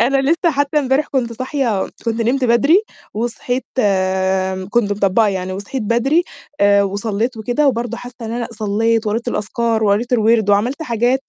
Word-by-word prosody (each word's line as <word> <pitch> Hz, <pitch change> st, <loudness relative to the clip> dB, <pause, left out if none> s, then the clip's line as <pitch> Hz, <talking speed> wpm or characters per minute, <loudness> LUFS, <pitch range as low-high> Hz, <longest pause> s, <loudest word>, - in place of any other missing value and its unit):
أنا 265 Hz, +4 st, +3 dB
لسّه 335 Hz, 0 st, +2 dB
حتّى 285 Hz, 0 st, 0 dB
امبارح 270 Hz, +1 st, +1 dB
كنت 245 Hz, -4 st, -1 dB
صاحية 255 Hz, -5 st, -1 dB, 0.2 s
كنت 230 Hz, 0 st, -1 dB
نمت 255 Hz, +3 st, +1 dB
بدري 280 Hz, -, +4 dB, 0.3 s
وصحيت 240 Hz, +2 st, -2 dB
آآ 190 Hz, -2 st, +1 dB
كنت 210 Hz, -3 st, +1 dB
مطبّقة 205 Hz, +2 st, +2 dB
يعني 185 Hz, -1 st, -3 dB
وصحيت 205 Hz, +7 st, -5 dB
بدري، 260 Hz, +10 st, +2 dB, 0.4 s
آآ 200 Hz, 0 st, +5 dB
وصلّيت 205 Hz, +4 st, -2 dB
وكده 245 Hz, +7 st, +1 dB
وبرضه 235 Hz, -2 st, -2 dB
حاسّة 245 Hz, 0 st, -10 dB
إن 225 Hz, -, -4 dB
أنا 235 Hz, 0 st, -3 dB
صلّيت 220 Hz, +1 st, 0 dB
وقريت 225 Hz, +3 st, -1 dB
الأذكار 225 Hz, +1 st, -1 dB
وقريت 210 Hz, +4 st, +1 dB
الوِرْد 220 Hz, -2 st, +3 dB
وعمَلت 240 Hz, +10 st, +1 dB
حاجات، 245 Hz, +1 st, 0 dB
230 Hz, 160 wpm, -18 LUFS, 205-255 Hz, 0.4 s, آآ